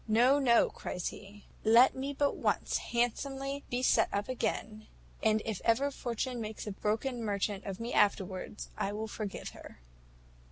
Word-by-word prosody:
`No, 250 +6 +5
no,' 235 -3 +4
cries 180 - -4
he; 205 0 -12 0.2
`let 230 +4 +7
me 270 +2 -3
but 285 0 +1
once - - 0
handsomely 270 +4 -2
be 245 +1 -1
set - - +4
up 205 +4 -2
again, 215 -3 -3 0.3
and 220 0 +2
if 220 -4 -3
ever 265 +5 +2
Fortune 245 -1 -3
makes 215 0 -5
a 210 - -3
broken 225 +5 -1
merchant 200 -1 -1
of 195 -1 -5
me 230 +1 -4
afterwards, 185 - 0
I 200 - -2
will 220 +1 -3
forgive 210 -2 -5
her.' - - -12
225 Hz, 160 wpm, -32 LUFS, 210-255 Hz, 0.3 s, `let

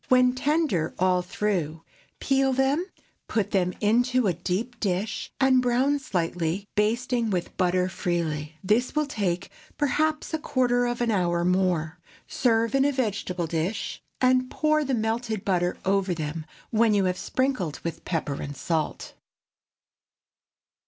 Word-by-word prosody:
When 255 0 +5
tender 270 - 0
all 185 0 +3
through, 175 -4 -2 0.4
peel 270 -1 +2
them, 270 +7 +1 0.4
put 210 -2 -1
them 180 -3 +2
into 245 +3 +3
a 185 - +2
deep 195 +8 -3
dish, 200 +1 -2
and 265 -1 +5
brown 255 +4 +2
slightly, 175 -4 -2
basting 235 +2 +1
with 180 -4 -2
butter 180 0 +2
freely. 165 -5 -2
This 225 +9 +1
will 300 0 +2
take 195 -9 -2 0.3
perhaps 305 +3 0
a 315 - 0
quarter 245 -3 +1
of 240 0 -2
an 235 -1 +2
hour 175 -3 +1
more. 180 -3 +1 0.3
Serve 230 -2 +1
in 270 0 +4
a 285 - +3
vegetable 205 -9 -2
dish, 165 +6 -3 0.2
and 255 0 +3
pour 305 0 +2
the 270 -2 0
melted 220 -1 -2
butter 180 -2 +1
over 195 -2 +1
them 155 0 -4 0.2
when 220 -1 +3
you 195 -2 +3
have 180 -1 +1
sprinkled 255 - -1
with 170 - -5
pepper 150 -5 -2
and 140 -1 -6
salt. 160 +1 -2
210 Hz, 140 wpm, -26 LUFS, 180-255 Hz, 0.4 s, When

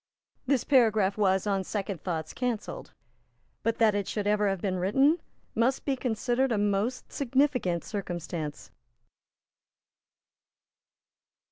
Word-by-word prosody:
This 265 -2 +2
paragraph 220 -7 +3
was, 190 -2 +2
on 195 -2 0
second 195 -3 -4
thoughts, 160 -4 -3
cancelled; 245 -4 -3 0.7
but 230 +1 0
that 220 -2 +4
it 205 -1 -1
should 210 -2 -2
ever 210 0 +2
have 195 -1 -1
been 185 0 -1
written 270 - +3 0.3
must 240 +4 +1
be 275 - +1
considered 250 +1 0
a 225 - +2
most 205 +5 -1
significant 255 - +1
circumstance. 175 -6 -5
210 Hz, 115 wpm, -28 LUFS, 190-250 Hz, 0.7 s, that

